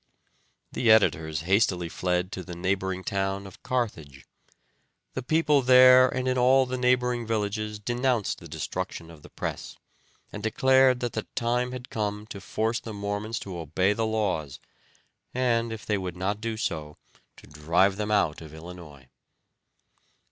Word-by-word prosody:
The 120 - 0
editors 80 -8 +3
hastily 90 -1 +2
fled 90 +2 -1
to 95 - -5
the 90 -1 -8
neighboring 95 +1 -2
town 95 0 -2
of 95 - -13
Carthage. 80 - -3 0.9
The 130 - -3
people 150 +1 +2
there 130 0 +7
and 130 0 -2
in 130 0 +1
all 130 +2 +5
the 130 0 -4
neighboring 125 -2 +1
villages 105 -1 -2
denounced 120 +1 -1
the - - -11
destruction 85 0 -5
of 80 -2 -14
the - - -14
press, - - -6 0.6
and 105 - -6
declared 130 +3 +3
that 120 -1 -2
the 110 - -4
time 125 +1 0
had 125 0 -8
come 105 -1 -3
to 100 - -7
force 110 +5 -1
the 110 - -8
Mormons 100 +2 -3
to 95 -2 -7
obey 90 +5 +1
the 110 +1 -1
laws, 95 -11 -2 0.8
and, 120 -2 +1
if 110 -2 -7
they 105 -2 0
would 90 -2 -5
not 100 +3 -2
do 115 -1 -3
so, 75 -8 -4 0.4
to - - -15
drive 85 +7 +1
them 105 0 -2
out 100 -8 +1
of 80 -1 -11
Illinois. 80 -5 -11
105 Hz, 155 wpm, -26 LUFS, 90-120 Hz, 0.9 s, there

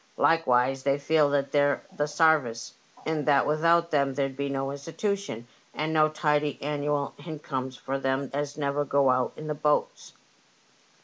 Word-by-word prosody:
Like 165 0 +3
wise 130 +2 +2
they 140 +1 +1
feel 150 +1 +2
that 140 -1 0
they're 145 -1 +2
the 150 - 0
sarvice, 150 -7 +1 0.3
and 155 -2 -2
that 145 -2 +4
without 165 +2 +2
them 140 -2 +1
there'd 135 -1 -1
be 140 +1 -3
no 135 0 -2
Institution, 165 - -4 0.3
and 155 +1 -2
no 155 -1 +4
tidy 150 -1 0
annual 145 0 -2
hincomes 135 -5 -5
for 135 +2 -4
them 135 0 -1
as 145 +1 -3
never 145 0 0
go 140 -1 +3
out 125 0 +1
in 155 - -8
the 155 - -2
boats." 150 0 -1
145 Hz, 165 wpm, -27 LUFS, 135-155 Hz, 0.3 s, that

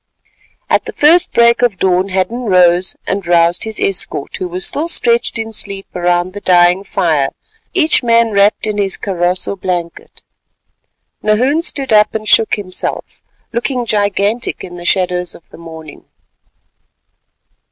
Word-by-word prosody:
At - - +1
the - - -7
first 330 +4 +4
break 235 0 +3
of 240 -6 +1
dawn 185 +1 +1
Hadden 195 +6 -2
rose 180 -2 +3
and 195 -2 -3
roused 170 +1 +2
his 220 -1 -5
escort, 185 -7 -1
who 185 - -4
were 180 +1 -5
still 295 - -1
stretched 235 -9 +1
in 225 0 -5
sleep 200 -2 -1
around 175 +1 0
the 205 - -8
dying 180 +1 +3
fire, 155 -8 0 0.5
each 320 -4 +2
man 230 -2 +2
wrapped 200 +1 +2
in 210 -1 -2
his 195 -1 0
kaross 180 -2 -1
or - - -3
blanket. 175 -3 -5 1.0
Nahoon 250 +9 +1
stood 275 -7 -1
up 210 0 +4
and 215 -1 -4
shook 225 - +3
himself, 185 -3 -5 0.3
looking 245 +1 -2
gigantic 205 +1 -1
in 175 -1 -9
the 175 0 -9
shadows 180 -1 0
of 170 - -17
the - - -14
morning. 160 -2 -11
195 Hz, 150 wpm, -14 LUFS, 180-225 Hz, 1.0 s, first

